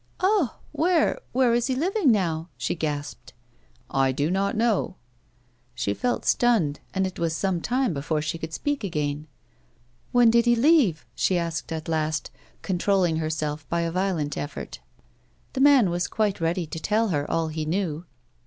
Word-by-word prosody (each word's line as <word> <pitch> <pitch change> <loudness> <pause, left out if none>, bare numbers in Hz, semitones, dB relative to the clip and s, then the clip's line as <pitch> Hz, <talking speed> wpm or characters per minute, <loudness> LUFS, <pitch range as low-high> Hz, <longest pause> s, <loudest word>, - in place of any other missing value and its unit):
"Ah! 375 - +2
Where 325 +2 +2
— - - -38
where 250 -1 +3
is 240 +1 +1
he 260 - 0
living 345 - +2
now? 170 -5 0
" - - -40
she 120 +1 -1
gasped. 150 -3 -5 0.3
" - - -31 0.2
I - - +1
do 145 +5 -1
not 200 +3 0
know." 225 -4 +1 0.8
She 115 -4 -1
felt 245 - -2
stunned, 215 -13 +2
and 190 0 0
it 185 - -5
was 165 -1 0
some 185 -1 -1
time 250 0 0
before 150 +2 -1
she 155 +2 -3
could 160 0 -6
speak 290 - -2
again. 150 -4 -2 0.4
" 120 0 -37
When 240 -2 +5
did 235 0 +4
he 240 0 +4
leave? 245 - +3
" - - -43
she 185 - +1
asked 170 -1 -3
at 160 -1 -4
last, 155 -1 -1 0.3
controlling 185 -2 +1
her 155 -1 -1
self 150 -1 -3
by 170 0 0
a 165 0 -1
violent 175 -5 -1
effort. 145 - -6 0.7
The 265 - -1
man 270 -9 +6
was 175 +1 -1
quite 210 -5 -1
ready 170 +2 0
to 160 +1 -6
tell 215 +5 +1
her 145 -4 -1
all 165 -1 0
he 155 0 -3
knew. 165 0 -2
175 Hz, 185 wpm, -25 LUFS, 155-235 Hz, 0.8 s, man